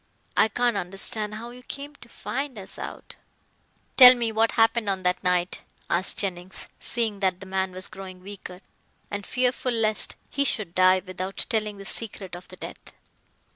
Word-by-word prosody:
I - - +5
can't 240 0 +1
understand 200 +3 0
how 235 +2 -7
you 250 +1 -12
came 280 +3 -7
to - - -14
find 270 +1 -4
us 195 - -7
out." - - -8 0.8
"Tell 255 -1 +12
me 235 -2 0
what 225 +1 +2
happened 225 -1 +3
on 190 -1 -1
that 180 0 +1
night?" 180 0 +1 0.3
asked 180 +3 +3
Jennings, 185 -2 -4
seeing 225 -4 0
that 185 -2 +1
the 195 - -9
man 190 0 -1
was 185 +1 -5
growing 190 -1 -10
weaker, 190 -2 -9 0.5
and 205 0 -3
fearful 250 0 0
lest 220 -2 +3 0.2
he 280 - +1
should 210 -10 -1
die 185 0 +4
without 185 +1 -4
telling 210 -2 -1
the 195 - -10
secret 195 -4 -3
of 175 - -11
the - - -11
death. - - -10
200 Hz, 175 wpm, -25 LUFS, 185-230 Hz, 0.8 s, Tell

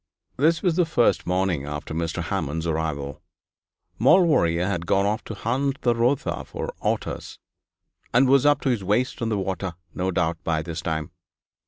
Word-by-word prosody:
This 160 +7 +2
was 180 -2 +2
on - - +7
the 165 - -6
first 120 - +2
morning 90 -5 0
after 75 +1 -5
Mr. 80 0 -2
Hammond's 80 +4 -2
arrival. 80 -4 -2 0.8
Maulevrier 115 - +4
had 90 -3 -2
gone 100 +3 +3
off 105 +3 -1
to 110 - -6
hunt 135 +6 -1
the 120 - +4
Rotha 120 +4 0
for - - -6
otters, - - -3 0.7
and 130 +3 +4
was 135 0 +5
up 145 0 +4
to 135 - 0
his 115 -6 0
waist 115 +8 0
in 115 - 0
the 105 - 0
water, 95 -2 -3 0.2
no 95 +1 -1
doubt, 85 -1 -1
by 80 -1 0
this 85 0 -5
time. 80 -3 -3
95 Hz, 175 wpm, -24 LUFS, 80-125 Hz, 0.8 s, on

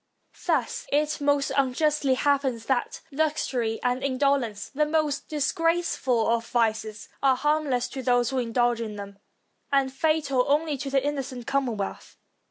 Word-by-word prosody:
Thus - - 0
it 300 +1 +1
most 285 -1 +2
unjustly 275 +1 +2
happens 265 -4 +1
that 260 -2 -1
luxury 270 -6 -1
and 250 +1 0
indolence, 270 -5 0
the 300 +2 0
most 305 -2 0
disgraceful 310 -6 +1
of 230 0 +1
vices, 220 -2 -1
are 270 -2 +4
harmless 295 -2 +1
to 270 - -5
those 245 -1 +2
who 265 - 0
indulge 240 0 +1
in 215 -2 -5
them, 200 -1 -9 0.5
and 270 -2 +2
fatal 285 -3 +1
only 300 +1 +2
to 275 +1 -5
the 270 0 +2
inno 285 0 -1
cent 255 -2 -8
commonwealth. 240 -8 -2
270 Hz, 145 wpm, -26 LUFS, 240-290 Hz, 0.5 s, are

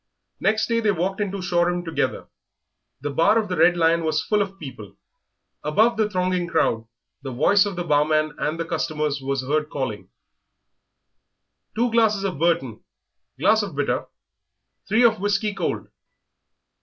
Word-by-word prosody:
Next 220 0 +1
day 230 -1 0
they 220 -2 +1
walked 190 +1 -1
into 200 -2 -3
Shoreham 175 -1 0
together. 165 - -2 0.8
The 145 +1 -3
bar 165 +9 +3
of 215 -3 0
the 180 - -1
"Red 175 +2 +4
Lion" 165 0 +3
was 155 0 0
full 210 +3 +1
of 195 -1 -4
people. 125 - -10 0.7
Above 220 +11 +3
the 215 -1 +1
thronging 180 -2 0
crowd 115 -9 0 0.3
the 135 -1 -6
voice 195 +11 +3
of 200 - -5
the 175 - -3
barman 155 0 +2
and 155 +2 -2
the 165 - -2
customers 150 -3 -2
were 135 +1 -2
heard 150 +4 -1
calling, 105 -9 -4 1.7
"Two 235 +2 +1
glasses 220 -3 +2
of 185 -7 -3
Burton, 165 -9 0 0.5
glass - - +3
of - - -6
bitter, - - -1 0.8
three 220 +4 +4
of 225 -2 +4
whiskey 205 +1 0
cold." 185 -4 -3
175 Hz, 155 wpm, -23 LUFS, 150-205 Hz, 1.7 s, Red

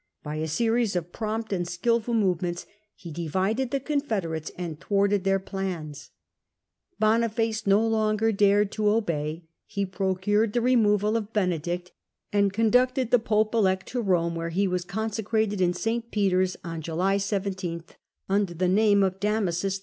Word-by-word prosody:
By 150 0 -4
a 155 +1 -2
series 225 +5 +1
of 175 0 -3
prompt 220 0 -3
and 175 -2 -1
skilful 230 +6 0
move 185 -6 +1
ments 175 -1 -3 0.3
he 170 - -10
divided 190 - -1
the 275 - -1
confederates 220 - -2
and 170 -4 -5
thwarted 200 -1 +1
their 195 0 +3
FopeDama 190 - -20
plans. 175 -7 -5 0.9
Bonifaco 225 0 +1
no 200 +3 +4
longer 220 0 +1
dared 205 0 +3
to 215 - -5
disobey; 165 -7 0
pointed*^ 160 - -36 0.2
he 200 -1 -2
procured 195 +3 0
the 240 - +1
removal 215 -4 +3
of 220 -2 -2
Benedict, 180 -2 -1 0.4
and 200 -1 +3
conducted 250 +4 +2
the 245 - +6
pope 215 -1 +1
elect 190 -4 +2
to 245 -2 -2
Eome, 170 -4 +1
where 165 0 -3
he 195 +4 +1
was 180 -1 -1
con 220 +4 -3
secrated 215 -2 -1
in 175 -1 +3
St. 230 +5 -2
Peter's 185 -3 +1
on 165 -1 -5
July 180 +5 0
17, 190 -4 -3 0.4
under 195 -2 0
the 180 +2 +1
name 200 +1 +4
of 190 0 -1
Damasus 195 -3 0
II. - - -15
200 Hz, 165 wpm, -26 LUFS, 180-220 Hz, 0.9 s, the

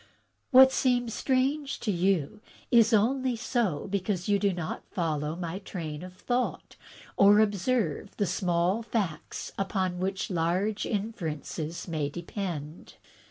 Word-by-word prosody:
"What 265 -1 +8
seems 245 -3 +1
strange 275 +2 0
to 215 - 0
you 185 0 0 0.3
is 230 -2 +6
only 250 +4 +2
so 220 - -1
because 190 -2 -2
you 205 -1 +3
do 200 0 +2
not 175 -3 -4
follow 155 -4 -2
my 175 +1 -4
train 165 -6 -6
of 180 0 -9
thought 245 +6 -2 0.4
or 205 +1 +7
observe 205 - 0
the 205 - +1
small 180 +2 +1
facts 205 -9 -3
upon 190 -2 -1
which 190 +2 -2
large 180 +5 0
inferences 170 - -4
may 155 -4 -1
depend. 170 -2 -6
195 Hz, 125 wpm, -28 LUFS, 170-225 Hz, 0.4 s, What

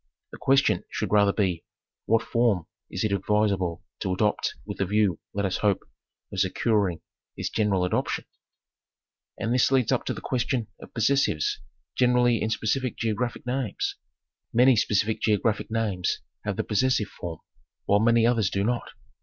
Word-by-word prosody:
The - - -10
question 135 +1 +3
should - - -3
rather 100 -1 +5
be, 95 -5 0 0.4
what 115 0 +3
form 115 -8 +1 0.2
is 95 - -3
it 110 - 0
advisable 100 -3 0 0.2
to 95 - -2
adopt 105 +3 0
with - - -7
the 100 - +2
view, 100 -4 +2
let 100 0 -1
us 95 - 0
hope, 100 -2 +1 0.5
of - - -3
securing 100 -7 +1 0.4
its - - -3
general 100 -4 +1
adoption? 90 - -1 1.1
And 115 - -1
this 125 +1 +3
leads 130 -4 +3
up - - +1
to - - -1
the - - -6
question 120 -3 -1
of - - -12
possessives 115 - +1 0.3
generally 125 -1 +3
im 110 - -1
specific 125 +3 -1
geographic 115 +2 -2
names. 125 -3 -2 0.6
Many 125 +2 +5
specific 105 0 +1
geographic 110 0 +1
names 110 -5 -1 0.2
have - - -2
the - - 0
possessive 115 -1 +1
form, 85 -2 -7 0.5
while 100 - +4
many 115 +1 +4
others 115 -5 +2
do 100 - -1
not. 120 +3 -2
110 Hz, 155 wpm, -26 LUFS, 100-120 Hz, 1.1 s, rather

